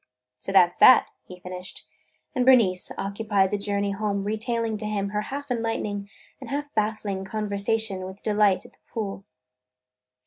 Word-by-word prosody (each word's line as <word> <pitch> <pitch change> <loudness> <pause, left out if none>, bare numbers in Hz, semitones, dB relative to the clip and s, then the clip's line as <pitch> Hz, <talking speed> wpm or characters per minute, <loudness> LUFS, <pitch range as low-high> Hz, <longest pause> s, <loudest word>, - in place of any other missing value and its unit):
"So - - -5
that 180 -2 +6
's - - -20
that!" 255 - +7 0.2
he 180 -1 -11
finished, 180 0 -8 0.5
and 255 -3 +1
Bernice 225 -8 +4
occupied 200 -1 0
the 205 - 0
journey 200 0 -1
home 200 0 -2
retailing 225 +2 -1
to 210 0 -4
him 200 -2 -2
her 210 +1 -1
half 280 +4 -6
enlightening 215 -4 -2 0.3
and - - -9
half 290 +1 -4
baffling 210 -3 -1
conversation 200 -1 -1
with 190 +1 -11
Delight 210 -3 +2
at - - -16
the - - -28
pool. 200 -3 -5
205 Hz, 160 wpm, -25 LUFS, 195-225 Hz, 0.5 s, that